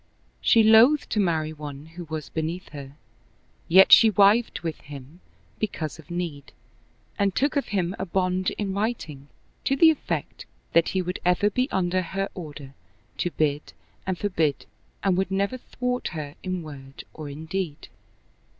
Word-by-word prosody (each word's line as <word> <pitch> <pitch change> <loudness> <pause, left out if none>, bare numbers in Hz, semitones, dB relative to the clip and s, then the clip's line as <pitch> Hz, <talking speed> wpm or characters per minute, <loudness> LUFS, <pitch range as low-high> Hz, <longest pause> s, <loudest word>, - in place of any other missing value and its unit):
She 225 - +5
loathed 230 +7 +6
to 210 - +1
marry 160 -5 0
one 145 -1 -8
who 175 -1 -7
was 155 -1 -6
beneath 165 +4 -4
her; 140 -2 -9 0.7
yet 190 +3 +7
she 225 - +9
wived 210 +3 +3
with 165 -3 -5
him 145 +3 -11 0.4
because 160 -8 -3
of 155 - -15
need, 170 -5 -5 0.7
and 200 -2 +1
took 285 +3 +1
of 280 - 0
him 185 -2 -1
a 190 - -3
bond 185 +1 0
in 200 -2 -2
writing 195 - -3 0.4
to 270 - +1
the 320 +3 +7
effect 310 - -4 0.3
that 170 -1 +4
he 185 - +1
would 180 +1 -4
ever 180 +4 +2
be 255 +5 0
under 185 0 0
her 195 +3 -3
order 145 -5 -9 0.5
to 175 - 0
bid 145 - -1 0.3
and 185 -1 -1
forbid 165 -9 0 0.4
and 190 -2 +2
would 190 -1 0
never 200 +6 -1
thwart 250 0 -3
her 145 -2 -5
in 185 -2 -3
word 135 -3 -10
or 155 -2 -7
in 150 +3 -8
deed. 170 -3 -4
180 Hz, 160 wpm, -25 LUFS, 155-200 Hz, 0.7 s, she